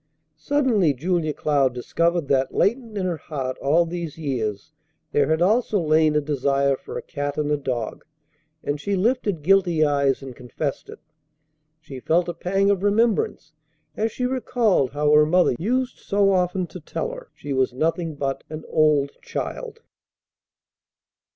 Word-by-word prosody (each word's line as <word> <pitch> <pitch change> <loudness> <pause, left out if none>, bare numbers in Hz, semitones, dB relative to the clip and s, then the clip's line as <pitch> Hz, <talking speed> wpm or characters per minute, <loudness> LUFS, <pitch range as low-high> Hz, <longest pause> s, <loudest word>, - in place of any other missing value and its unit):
Suddenly 225 - +2
Julia 165 +2 0
Cloud 140 -4 +1
discovered 170 +5 0
that 135 -1 +1
latent 230 0 0
in 190 - -1
her 175 -3 -1
heart 135 -4 -4
all 160 +5 +3
these 170 -2 -5
years 120 -6 -3 0.4
there 145 -1 +2
had 160 +2 +2
also 215 +1 +2
lain 155 -1 +3
a 150 - +3
desire 140 -1 +1
for - - -8
a - - -6
cat 145 -2 -4
and 150 -1 0
a - - +3
dog; 125 -6 -4 0.6
and 145 0 -2
she 200 +6 -1
lifted 205 - 0
guilty 175 -3 +3
eyes, 140 -2 +1
and 130 -2 -8
confessed 135 +4 -5
it. - - -9 0.8
She 140 -4 -9
felt 170 +6 +1
a 175 - -2
pang 195 +4 +1
of 195 -2 0
remembrance 205 -6 +1 0.4
as 220 +1 -1
she 250 - -3
recalled 240 - +1
how 150 0 +1
her 150 0 +7
mother 175 +1 +3
used 250 +7 -1
so 200 0 +2
often 180 0 +1
to 180 - -10
tell 470 - -4
her - - -10
she 145 - -5
was 130 -1 +1
nothing 160 +4 -1
but 135 -1 -3
an 155 0 -7
"old 150 -2 +3
child." 460 -2 -5
160 Hz, 160 wpm, -23 LUFS, 140-195 Hz, 0.8 s, her